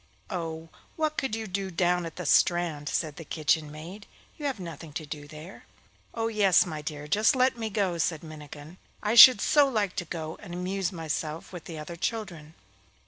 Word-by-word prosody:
'Oh, 165 -3 -5 0.3
what 310 -1 -1
could 265 -7 -1
you 225 0 -4
do 195 -1 -3
down 175 0 +1
at 165 - -10
the 180 - -6
strand?' 165 -3 +2
said 155 -3 -2
the 165 - -7
kitchen 155 0 0
maid. 175 +7 -10 0.3
'You 295 - -3
have 265 -7 -3
nothing 165 -3 -8
to 155 - -5
do 145 0 -8
there.' 155 +5 -11 0.5
'Oh 225 -1 0
yes, 210 -4 +4
my 155 -4 -5
dear, 150 0 -6
just 215 - +3
let 260 0 +3
me 225 -2 -4
go,' 190 -5 -1
said 160 -1 -1
Minnikin. 155 +1 -10 0.3
'I 210 +1 +1
should 245 -1 +11
so 290 +6 +4
like 210 -6 -1
to 175 - -2
go 160 -1 -6
and 175 - -8
amuse 185 +1 -2
myself 160 -1 -4
with 175 -3 -8
the 165 - -7
other 155 +3 -7
children. 170 -6 -4
175 Hz, 195 wpm, -27 LUFS, 155-205 Hz, 0.5 s, should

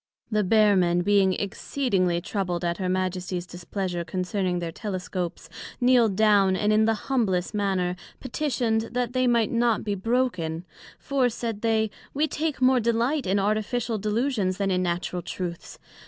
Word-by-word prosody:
The 215 -1 +2
Bear 210 +1 +4
men 175 -1 +2
being 195 0 +3
exceedingly 195 -4 -1
troubled 180 -3 -2
at 170 0 -1
her 185 -1 -1
Majesties 185 -1 -2
displeasure 175 0 -4
concerning 180 +1 -2
their 170 -1 -3
Telescopes, 185 -2 -4 0.3
kneel'd 245 -5 +4
down, 200 -2 +4
and 210 +3 +1
in 215 +1 +4
the 225 0 +2
humblest 210 -9 0
manner 190 -3 0 0.2
petitioned, 240 -5 -1
that 245 -1 -1
they 255 -1 +2
might 235 -3 +2
not 235 -2 +2
be 205 - -1
broken; 190 -6 -1 0.3
for, 270 -3 +1
said 225 -2 -4
they, 220 -2 +1 0.2
we 300 +3 +2
take 310 -1 -2
more 255 0 +5
delight 235 +4 0
in 190 +2 +2
Artificial 215 +3 0
delusions, 210 -2 0
then 195 -1 0
in 180 0 +1
Natural 175 0 -2
truths. 175 -1 -6
205 Hz, 155 wpm, -25 LUFS, 180-235 Hz, 0.3 s, more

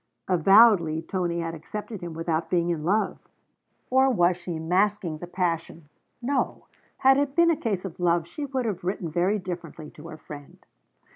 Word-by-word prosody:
Avowedly 185 -3 +5
Tony 175 -2 -2
had 165 0 -4
accepted 205 +6 -7
him 170 -2 -6
without 165 0 -2
being 175 -1 +1
in 160 -3 -3
love. 205 +6 0 0.7
Or 265 +1 +5
was 180 -7 +3
she 175 -1 -6
masking 180 0 0
the 175 - -7
passion? 170 -3 -3 0.3
No: 275 +2 -1 0.3
had 265 0 +5
it 285 -1 -1
been 340 0 +5
a - - +2
case 205 -9 -3
of 185 -2 -8
love, 170 -1 +2
she 285 - -6
would 265 -2 -2
have 195 -5 -3
written 180 -3 -3
very 180 +6 +1
differently 170 -5 -7
to 155 +2 -12
her 165 -2 -9
friend. 145 -2 -12
175 Hz, 170 wpm, -26 LUFS, 165-210 Hz, 0.7 s, Avowedly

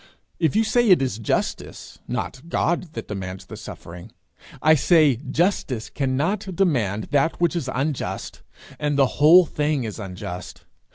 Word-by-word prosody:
If 165 +2 +1
you 220 - +4
say 235 +1 +2
it 185 - +7
is 130 -5 -2
justice, 110 - -3
not 140 +6 -5
God 170 -1 -1
that 115 - -6
demands 95 -2 -6
the - - -9
suffering, 90 +5 -10 0.5
I 155 - +5
say 155 -4 +4
justice 145 - -1
cannot 165 +9 -1
demand 115 - 0
that 145 +3 +1
which 175 0 +1
is 150 -6 -2
unjust, 135 +2 -3 0.4
and 150 -1 0
the 140 - +5 0.2
whole 170 +4 +8
thing 150 -3 -1
is 110 -1 -6
unjust. 90 -2 -7
145 Hz, 150 wpm, -23 LUFS, 115-170 Hz, 0.5 s, whole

